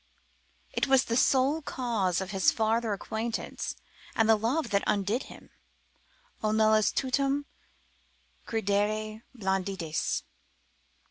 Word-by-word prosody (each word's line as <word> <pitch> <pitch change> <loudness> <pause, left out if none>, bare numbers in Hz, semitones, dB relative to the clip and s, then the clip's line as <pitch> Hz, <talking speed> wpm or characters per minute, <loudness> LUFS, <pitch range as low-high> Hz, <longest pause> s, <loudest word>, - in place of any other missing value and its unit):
——— - - -39 0.3
It - - +1
was 270 -1 +5
the 230 - -1
sole 270 +5 +3
cause 225 - -1
of 190 0 -5
his 190 -2 +3
farther 225 0 +1
acquaintance, 220 +3 -3 0.4
and 225 - +3
love 230 +5 +2
that 200 0 +2
undid 205 +5 +1
him. - - -14 0.9
O 215 - +1
nullis 215 0 +4
tutum 275 +2 0 1.0
credere 215 0 0 0.2
blanditiis. 190 -5 -1
220 Hz, 110 wpm, -29 LUFS, 200-240 Hz, 1.0 s, was